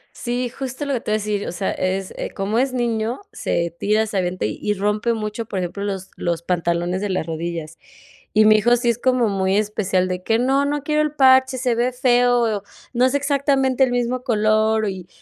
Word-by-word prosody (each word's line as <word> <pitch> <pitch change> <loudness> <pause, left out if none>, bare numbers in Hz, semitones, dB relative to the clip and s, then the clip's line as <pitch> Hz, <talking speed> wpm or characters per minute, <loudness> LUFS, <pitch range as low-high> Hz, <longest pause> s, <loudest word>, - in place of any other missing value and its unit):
Sí, 245 +1 -2
justo 265 +3 -5
lo 280 - -1
que 245 - -1
te - - -5
iba - - +3
a - - +2
decir, 210 -1 -2
o - - -4
sea, 190 +2 -2
es 185 +1 -2 0.2
como 200 +3 -1
es 260 +1 +1
niño, 235 -1 -1
se 170 -1 -2
tira, 215 +2 +1
se 205 -2 -2
avienta 180 0 -2
y 160 - -2
rompe 210 +3 0
mucho, 220 0 -4
por 195 - -3
ejemplo, 185 +3 -4
los 195 -2 -4
los 170 -1 -2
pantalones 175 +1 -1
de 205 0 -2
las 185 -4 -1
rodillas. 165 -1 -5 0.5
Y 215 0 +5
mi 215 0 +7
hijo 240 +3 +3
sí 240 0 +1
es 235 - -1
como 250 -2 +2
muy 190 -1 0
especial, 195 -3 0
de 180 0 -3
que: 225 +3 +1
“No, 270 +3 +2
no 290 0 -1
quiero 300 +1 +1
el 305 -1 -1
parche, 260 -2 +4
se 250 -1 +1
ve 245 +2 +1
feo, 245 -4 +2 0.3
no 245 0 +2
es 260 +1 +2
exactamente 275 -2 +2
el 250 - -1
mismo 245 +1 -1
color”, 215 -2 +2
y 185 -2 -6
220 Hz, 215 wpm, -21 LUFS, 190-250 Hz, 0.5 s, mi